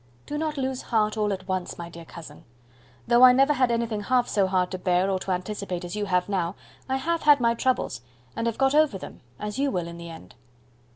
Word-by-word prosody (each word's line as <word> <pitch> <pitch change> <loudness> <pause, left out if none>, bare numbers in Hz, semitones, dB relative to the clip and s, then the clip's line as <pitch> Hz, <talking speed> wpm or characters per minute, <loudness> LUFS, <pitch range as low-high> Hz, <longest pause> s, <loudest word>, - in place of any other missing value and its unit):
Do 295 - -5
not 305 0 -2
lose 260 -1 -2
heart 215 -2 0
all 210 -1 0
at 190 -1 -5
once, 185 -1 -3
my 170 - -6
dear 170 -1 -11
cousin. 160 -3 -11 0.6
Though 240 +1 +4
I 255 -1 +9
never 275 +3 +4
had 255 -3 +2
anything 230 -2 -1
half 245 +3 +1
so 200 -2 +1
hard 185 -1 0
to 185 - -4
bear 180 +1 +1
or 190 - 0
to 190 - -7
anticipate 185 -1 -3
as 175 - -6
you 210 -1 -2
have 180 -2 +1
now, 185 -2 -1 0.3
I 265 - +1
have 330 +5 -1
had 295 -1 +6
my 235 -1 +3
troubles, 250 - -1 0.3
and 230 - -1
have 230 - -2
got 270 0 +2
over 300 -8 +3
them, - - -10 0.2
as 210 +4 -4
you 280 0 +2
will 180 -7 -2
in 170 0 -9
the 170 0 -8
end." 160 - -12
210 Hz, 235 wpm, -25 LUFS, 180-255 Hz, 0.6 s, I